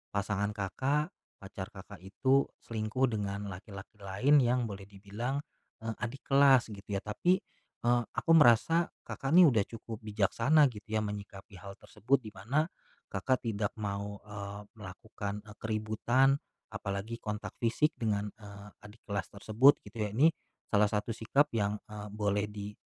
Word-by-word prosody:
pasangan 100 Hz, 0 st, 0 dB
Kakak, 135 Hz, -, -1 dB, 0.3 s
pacar 95 Hz, -1 st, -7 dB
Kakak 100 Hz, 0 st, -11 dB
itu 130 Hz, +8 st, +2 dB, 0.2 s
selingkuh 110 Hz, +3 st, 0 dB
dengan 100 Hz, -1 st, -3 dB
laki-laki 100 Hz, +2 st, -10 dB
lain 105 Hz, +10 st, +3 dB
yang 125 Hz, 0 st, +2 dB
boleh 100 Hz, -3 st, -7 dB
dibilang, 105 Hz, +7 st, -4 dB, 0.5 s
eee, 115 Hz, 0 st, -2 dB
adik 120 Hz, +3 st, -4 dB
kelas 135 Hz, -4 st, +5 dB
gitu 100 Hz, -1 st, -12 dB
ya 100 Hz, -, -2 dB
tapi, 110 Hz, -, +2 dB, 0.5 s
eee, 120 Hz, 0 st, +4 dB, 0.2 s
aku -, -, +1 dB
merasa 165 Hz, +4 st, +6 dB, 0.2 s
Kakak, 135 Hz, -, -4 dB
nih 180 Hz, 0 st, +10 dB
udah 110 Hz, -4 st, +3 dB
cukup 110 Hz, -1 st, -8 dB
bijaksana 110 Hz, +8 st, +3 dB
gitu 105 Hz, -, -11 dB
ya 110 Hz, 0 st, 0 dB
menyikapi 100 Hz, -1 st, -8 dB
hal 100 Hz, -1 st, -9 dB
tersebut 115 Hz, +8 st, 0 dB
di 110 Hz, -, -8 dB
mana, 120 Hz, +11 st, 0 dB, 0.5 s
Kakak, 125 Hz, +7 st, 0 dB
tidak 105 Hz, -3 st, -1 dB
mau, 100 Hz, -1 st, -4 dB
eee, 100 Hz, -1 st, -7 dB, 0.2 s
melakukan, 105 Hz, +1 st, -6 dB
eee, 105 Hz, -1 st, -13 dB
keributan, 110 Hz, +5 st, +2 dB, 0.3 s
apalagi 100 Hz, +4 st, -4 dB
kontak 105 Hz, -1 st, -5 dB
fisik 125 Hz, +6 st, +2 dB
dengan, 105 Hz, -2 st, -1 dB
eee, 100 Hz, -1 st, -11 dB, 0.2 s
adik 105 Hz, +2 st, -17 dB
kelas 100 Hz, -3 st, -3 dB
tersebut 110 Hz, +7 st, +4 dB
gitu 115 Hz, -, -11 dB
ya 105 Hz, -, -8 dB
ini, 155 Hz, +7 st, +6 dB, 0.4 s
salah 105 Hz, 0 st, +5 dB
satu 105 Hz, +2 st, -2 dB
sikap 115 Hz, +6 st, +1 dB
yang, 105 Hz, -2 st, 0 dB, 0.2 s
eee, 105 Hz, -1 st, -7 dB
boleh 105 Hz, 0 st, -1 dB
di, 105 Hz, 0 st, -7 dB
105 Hz, 150 wpm, -31 LUFS, 100-120 Hz, 0.5 s, nih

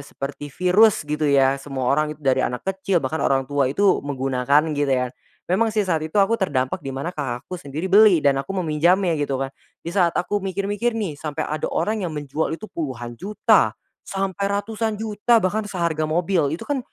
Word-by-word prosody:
seperti 145 Hz, +1 st, -7 dB
virus 185 Hz, +6 st, +3 dB
gitu 150 Hz, 0 st, -1 dB
ya 135 Hz, -1 st, +3 dB
semua 135 Hz, -2 st, -1 dB
orang 150 Hz, +1 st, 0 dB
itu 150 Hz, -, -21 dB
dari 130 Hz, -1 st, +3 dB
anak 125 Hz, 0 st, -2 dB
kecil 190 Hz, -1 st, -1 dB
bahkan 160 Hz, +5 st, -2 dB
orang 135 Hz, -1 st, +2 dB
tua 140 Hz, -1 st, 0 dB
itu 195 Hz, +8 st, +2 dB
menggunakan 140 Hz, +2 st, +1 dB
gitu 145 Hz, -1 st, 0 dB
ya, 125 Hz, 0 st, -2 dB, 0.3 s
memang 215 Hz, +6 st, +1 dB
sih 215 Hz, -2 st, 0 dB
saat 165 Hz, -4 st, 0 dB
itu 155 Hz, +5 st, -5 dB
aku 205 Hz, +2 st, +3 dB
terdampak 130 Hz, -8 st, 0 dB
di -, -, -7 dB
mana 135 Hz, +7 st, -4 dB
Kakakku 145 Hz, +5 st, -5 dB
sendiri 145 Hz, +5 st, -5 dB
beli 200 Hz, -7 st, +6 dB
dan 135 Hz, -1 st, +3 dB
aku 195 Hz, +8 st, -6 dB
meminjamnya 170 Hz, +4 st, +2 dB
gitu 140 Hz, -2 st, -1 dB
kan, 135 Hz, +1 st, -3 dB, 0.3 s
di 170 Hz, -, -4 dB
saat 175 Hz, -4 st, +2 dB
aku 205 Hz, +3 st, 0 dB
mikir-mikir 205 Hz, +4 st, -2 dB
nih 175 Hz, -10 st, -4 dB
sampai 150 Hz, -2 st, -3 dB
ada 155 Hz, 0 st, -3 dB
orang 215 Hz, +1 st, -1 dB
yang 165 Hz, -5 st, -4 dB
menjual 145 Hz, +2 st, -2 dB
itu 215 Hz, -, -11 dB
puluhan 125 Hz, -7 st, -5 dB
juta, 210 Hz, +3 st, +2 dB, 0.3 s
sampai 195 Hz, 0 st, -3 dB, 0.2 s
ratusan 220 Hz, 0 st, -3 dB
juta 220 Hz, +1 st, +2 dB
bahkan 210 Hz, +4 st, 0 dB
seharga 170 Hz, -5 st, -1 dB
mobil 165 Hz, -2 st, +1 dB
itu -, -, -7 dB
kan, 285 Hz, -2 st, 0 dB
160 Hz, 190 wpm, -22 LUFS, 140-195 Hz, 0.3 s, beli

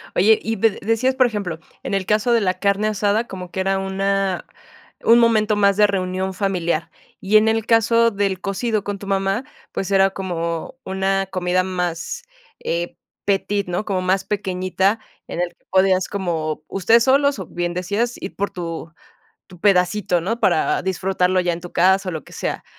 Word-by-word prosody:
Oye, 215 Hz, +4 st, +5 dB
y 225 Hz, +1 st, -2 dB
de 220 Hz, 0 st, +1 dB
decías, 225 Hz, +5 st, +1 dB
por 260 Hz, -, +4 dB
ejemplo, 200 Hz, -8 st, -3 dB, 0.2 s
en -, -, -5 dB
el 195 Hz, -1 st, -1 dB
caso 215 Hz, +4 st, +1 dB
de 230 Hz, -, +4 dB
la 185 Hz, -2 st, 0 dB
carne 200 Hz, +1 st, +1 dB
asada, 210 Hz, +2 st, +1 dB
como 180 Hz, -2 st, -7 dB
que 190 Hz, -, -4 dB
era 195 Hz, 0 st, +1 dB
una 195 Hz, -1 st, -1 dB, 0.6 s
un 235 Hz, +1 st, +6 dB
momento 220 Hz, -2 st, +3 dB
más 200 Hz, -1 st, +4 dB
de 210 Hz, -, +6 dB
reunión 190 Hz, -1 st, -2 dB
familiar. 180 Hz, -4 st, -1 dB, 0.3 s
Y 200 Hz, +3 st, 0 dB
en 215 Hz, -, +4 dB
el 225 Hz, 0 st, 0 dB
caso 230 Hz, 0 st, +4 dB
del 200 Hz, -2 st, -1 dB
cocido 205 Hz, +2 st, -1 dB
con 205 Hz, -1 st, -4 dB
tu 200 Hz, -, -9 dB
mamá, 195 Hz, +4 st, 0 dB, 0.3 s
pues 195 Hz, -, -3 dB
era 195 Hz, 0 st, +4 dB
como 170 Hz, -1 st, -4 dB
una 195 Hz, +1 st, 0 dB
comida 185 Hz, -1 st, 0 dB
más, 180 Hz, -, -3 dB, 0.4 s
eh, 170 Hz, +1 st, -2 dB, 0.3 s
petite, 200 Hz, 0 st, 0 dB
¿no?, 175 Hz, +4 st, -1 dB
como 190 Hz, -3 st, -1 dB
más 185 Hz, +1 st, +1 dB
pequeñita, 190 Hz, +1 st, 0 dB, 0.3 s
en 175 Hz, -, -3 dB
el 180 Hz, -, 0 dB
que 175 Hz, -, -31 dB
podías 190 Hz, -1 st, +3 dB
como 165 Hz, -6 st, -3 dB
ustedes 225 Hz, +4 st, +4 dB
solos, 280 Hz, -1 st, +3 dB
o 185 Hz, -, -6 dB
bien 175 Hz, 0 st, -3 dB
decías 205 Hz, +7 st, -1 dB
ir 190 Hz, -, -6 dB
por 200 Hz, +1 st, -1 dB
tu 165 Hz, -1 st, -6 dB, 0.5 s
tu 180 Hz, -3 st, -16 dB
pedacito, 180 Hz, -1 st, +2 dB
¿no?, 225 Hz, +8 st, -2 dB
para 170 Hz, -4 st, +2 dB
disfrutarlo 185 Hz, 0 st, +1 dB
ya 180 Hz, -1 st, 0 dB
en 170 Hz, -, -5 dB
tu 175 Hz, 0 st, -10 dB
casa, 190 Hz, +2 st, +3 dB
o -, -, -6 dB
lo 160 Hz, -, -5 dB
que -, -, -16 dB
sea. -, -, -4 dB
195 Hz, 185 wpm, -21 LUFS, 180-210 Hz, 0.6 s, un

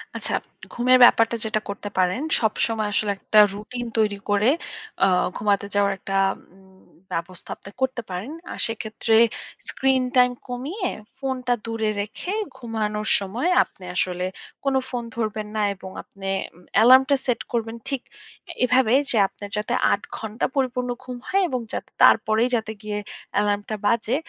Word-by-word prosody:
আচ্ছা, -, -, +1 dB, 0.4 s
ঘুমের 255 Hz, +1 st, +4 dB
ব্যাপারটা 230 Hz, -1 st, +6 dB
যেটা 215 Hz, -1 st, 0 dB
করতে 205 Hz, 0 st, -5 dB
পারেন, 185 Hz, +6 st, +2 dB, 0.2 s
সবসময় 220 Hz, -1 st, 0 dB
আসলে 210 Hz, 0 st, +1 dB
একটা 215 Hz, +2 st, +3 dB
রুটিন 230 Hz, +4 st, -6 dB
তৈরি 210 Hz, -2 st, +2 dB
করে, 205 Hz, +4 st, +4 dB, 0.5 s
আ -, -, +8 dB, 0.3 s
ঘুমাতে 200 Hz, -1 st, +1 dB
যাওয়ার 200 Hz, 0 st, +3 dB
একটা 195 Hz, 0 st, -5 dB, 0.4 s
উম 190 Hz, 0 st, -21 dB, 0.3 s
ব্যবস্থা 175 Hz, +2 st, -5 dB
আপনি -, -, -13 dB
করতে 260 Hz, -1 st, 0 dB
পারেন। 185 Hz, +10 st, -5 dB, 0.2 s
আর -, -, -7 dB
সেক্ষেত্রে 225 Hz, 0 st, -1 dB, 0.5 s
স্ক্রিন 265 Hz, -1 st, +2 dB
টাইম 250 Hz, 0 st, +6 dB, 0.2 s
কমিয়ে, 285 Hz, -, -3 dB, 0.3 s
ফোনটা 255 Hz, -2 st, -1 dB
দূরে 225 Hz, -1 st, -1 dB
রেখে, 215 Hz, -, -5 dB, 0.2 s
ঘুমানোর 215 Hz, -3 st, -3 dB
সময় 225 Hz, -, -2 dB
আপনি 190 Hz, -, -19 dB
আসলে 180 Hz, 0 st, 0 dB, 0.4 s
কোনো 275 Hz, -1 st, +2 dB
ফোন 245 Hz, -2 st, -3 dB
ধরবেন 215 Hz, -2 st, -2 dB
না 215 Hz, -, +1 dB
এবং 190 Hz, 0 st, -9 dB
আপনি 195 Hz, -1 st, -10 dB, 0.3 s
ম -, -, -18 dB, 0.2 s
অ্যালার্মটা 260 Hz, +5 st, +7 dB
সেট 245 Hz, -3 st, 0 dB
করবেন 230 Hz, -2 st, -2 dB
ঠিক 275 Hz, -3 st, -2 dB, 0.6 s
এভাবে 250 Hz, -1 st, +4 dB, 0.2 s
যে, 230 Hz, -, +2 dB
আপনার 205 Hz, +1 st, -10 dB
যাতে 210 Hz, -, -1 dB, 0.2 s
৮ -, -, +1 dB, 0.2 s
ঘণ্টা 220 Hz, +1 st, -3 dB
পরিপূর্ণ 250 Hz, -2 st, 0 dB
ঘুম 250 Hz, -1 st, -6 dB
হয় 390 Hz, +1 st, +2 dB
এবং 255 Hz, -, -1 dB
যাতে -, -, -4 dB
তারপরেই 220 Hz, +2 st, +5 dB
যাতে 220 Hz, -1 st, -2 dB
গিয়ে 210 Hz, -1 st, -4 dB, 0.4 s
এলার্মটা 205 Hz, +1 st, 0 dB
বাজে, 230 Hz, +3 st, +2 dB
220 Hz, 150 wpm, -24 LUFS, 205-250 Hz, 0.6 s, আ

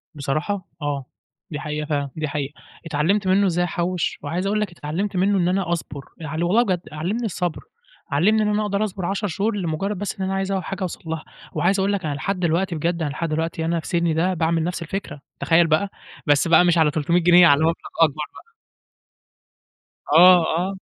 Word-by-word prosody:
بصراحة 155 Hz, +7 st, -2 dB
آه، 145 Hz, -2 st, -2 dB, 0.5 s
دي 150 Hz, -, -4 dB
حقيقة 150 Hz, 0 st, -4 dB
فعلًا، 145 Hz, -2 st, -1 dB
دي 155 Hz, -1 st, -2 dB
حقيقة، 145 Hz, -1 st, -3 dB, 0.3 s
اتعلمت 165 Hz, +6 st, +1 dB
منه 195 Hz, +2 st, +4 dB
إزاي 175 Hz, 0 st, +1 dB
أحوش 175 Hz, 0 st, -2 dB
وعايز 170 Hz, +6 st, -2 dB
أقول 210 Hz, +1 st, +1 dB
لك 210 Hz, -, -2 dB
اتعلمت 175 Hz, +5 st, -4 dB
منه 195 Hz, +2 st, +2 dB
إن 175 Hz, -, +2 dB
أنا 185 Hz, -1 st, 0 dB
أصبر، 145 Hz, -4 st, -4 dB
يعني 160 Hz, +1 st, -4 dB
والله 205 Hz, +8 st, +3 dB
بجد 185 Hz, -6 st, -1 dB
علمني 180 Hz, +10 st, -2 dB
الصبر 180 Hz, -5 st, -2 dB, 0.5 s
علمني 200 Hz, +10 st, +3 dB
إن -, -, +1 dB
أنا 210 Hz, 0 st, +1 dB
أقدر 205 Hz, 0 st, 0 dB
أصبر 190 Hz, -3 st, -3 dB
10 200 Hz, +3 st, -1 dB
شهور 205 Hz, +5 st, -1 dB
لمجرد 190 Hz, +2 st, -2 dB
بس 205 Hz, +2 st, -4 dB
إن 190 Hz, -, -1 dB
أنا 190 Hz, -, -2 dB
عايز 195 Hz, 0 st, -1 dB
أول 190 Hz, -1 st, -1 dB
حاجة 195 Hz, +1 st, -6 dB
أوصل 185 Hz, -2 st, -4 dB
لها، 160 Hz, -1 st, -4 dB, 0.3 s
وعايز 195 Hz, +3 st, +1 dB
أقول 195 Hz, +1 st, +1 dB
لك 195 Hz, -3 st, -2 dB
أنا 150 Hz, -, -1 dB
لحد 185 Hz, +7 st, -2 dB
دلوقتي 170 Hz, +1 st, 0 dB
بجد 170 Hz, +2 st, -1 dB
أنا 155 Hz, -, 0 dB
لحد 165 Hz, +3 st, -3 dB
دلوقتي 160 Hz, +1 st, -2 dB
أنا 170 Hz, +1 st, 0 dB
في -, -, -9 dB
سني 170 Hz, -1 st, +1 dB
ده 175 Hz, +4 st, +1 dB
باعمل 165 Hz, -1 st, +1 dB
نفس 175 Hz, +1 st, -3 dB
الفكرة 165 Hz, -4 st, -5 dB, 0.2 s
تخيل 165 Hz, 0 st, +4 dB
بقى، 160 Hz, +5 st, +1 dB, 0.4 s
بس 145 Hz, +2 st, +3 dB
بقى 165 Hz, +1 st, +6 dB
مش 175 Hz, -1 st, +3 dB
على 160 Hz, -2 st, +4 dB
300 160 Hz, +3 st, +1 dB
جنيه 175 Hz, +1 st, +7 dB
على 145 Hz, -2 st, +5 dB
مبلغ 165 Hz, +1 st, +3 dB, 0.3 s
أكبر 155 Hz, -1 st, +3 dB
بقى. -, -, -14 dB, 1.7 s
آه، 180 Hz, 0 st, +8 dB
آه. 190 Hz, +2 st, -2 dB
175 Hz, 205 wpm, -22 LUFS, 155-195 Hz, 1.7 s, آه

